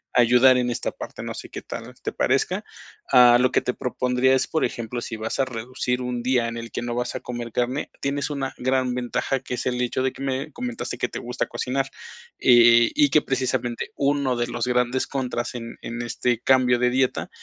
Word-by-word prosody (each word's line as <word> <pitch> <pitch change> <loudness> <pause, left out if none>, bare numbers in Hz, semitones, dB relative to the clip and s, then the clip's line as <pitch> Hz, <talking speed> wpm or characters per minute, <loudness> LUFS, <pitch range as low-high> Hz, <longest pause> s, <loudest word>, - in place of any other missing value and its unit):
a 125 - +7
ayudar 125 +2 +6
en 125 -1 0
esta 120 - -2
parte, - - -8
no - - -4
sé - - -9
qué - - -8
tal - - -7
te - - -2
parezca. - - 0 0.5
Ah 120 -1 +8
lo 130 - +3
que - - +2
te 125 - -2
propondría 125 +1 +1
es, 130 - +1
por 160 - 0
ejemplo, 120 +1 -3
si 115 - -5
vas 110 +3 -4
a 135 - +3
reducir 125 +1 -3
un 125 -1 -3
día 125 -1 +1
en 115 - -5
el 115 0 -7
que - - -4
no 120 0 -3
vas 125 +1 -2
a - - -2
comer 120 -1 -6
carne, 125 +5 -1
tienes 140 +1 -2
una 140 -2 -3
gran 130 0 0
ventaja 125 +2 -1
que 125 -1 -5
es - - -5
el 125 -1 0
hecho 125 +1 -1
de 130 - 0
que - - -11
me 135 +1 -2
comentaste 245 -1 -5
que - - 0
te - - -6
gusta 125 +1 -3
cocinar. 135 +1 -2 0.5
Eh, 120 -1 +6
y 295 -1 +4
que 155 - +4
precisamente 130 -3 -1
uno 140 -2 +1
de 120 0 0
los 120 0 -3
grandes 125 +1 +1
contras 125 -3 -3
en 115 -1 -7
en 120 +1 -5
este 120 0 -1
cambio 125 -1 +4
de 125 0 +2
dieta 130 0 0
125 Hz, 220 wpm, -24 LUFS, 120-130 Hz, 0.5 s, Ah